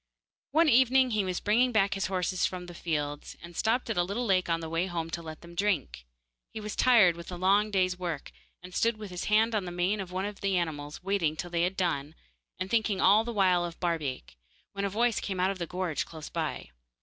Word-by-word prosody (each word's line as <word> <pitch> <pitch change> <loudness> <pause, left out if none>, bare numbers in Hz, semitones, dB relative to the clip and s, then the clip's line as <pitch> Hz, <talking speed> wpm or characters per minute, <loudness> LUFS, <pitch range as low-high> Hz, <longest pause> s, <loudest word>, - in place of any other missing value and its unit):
One 320 +3 +4
evening 260 -1 +5
he 215 -2 +1
was 185 -1 -2
bringing 240 +5 +3
back 200 -3 +2
his 195 -1 -1
horses 185 -1 -1
from 180 -1 -6
the 175 - -10
fields, 145 -4 -3
and 170 0 -11
stopped 230 +7 +1
at 225 - -2
a - - +4
little 205 +7 -2
lake 185 -4 +2
on 165 0 +1
the 165 - -5
way 165 +3 -1
home 165 -2 -4
to 170 - -3
let 160 -1 -9
them 170 0 -12
drink. 170 - -1 0.4
He - - -7
was 210 0 -5
tired 220 -9 +5
with 170 +1 -9
a - - -4
long 200 +4 +3
day's 185 -2 +1
work, 170 -5 -4 0.3
and 180 0 -10
stood 230 +3 +1
with 210 -3 -8
his 180 0 -4
hand 220 +2 +3
on 205 -3 0
the 175 - -5
mane 180 +4 0
of 185 -2 -5
one 185 +1 -2
of 205 -1 -6
the 195 -2 +1
animals, 150 -2 -4
waiting 185 -6 0
till 175 +2 -6
they 170 -1 0
had 180 +2 0
done, 160 -4 -1 0.4
and 185 - -3
thinking 215 -2 +1
all 210 +3 +5
the 235 - -4
while 185 -5 +3
of 170 -1 -6
Barbaik, 150 - -3 0.4
when 200 0 -2
a - - 0
voice 230 +2 +1
came 190 -2 -4
out 185 +2 +2
of 195 - -7
the 170 - -3
gorse 180 -3 -2
close 160 -2 -9
by. - - -4
185 Hz, 240 wpm, -29 LUFS, 170-210 Hz, 0.4 s, evening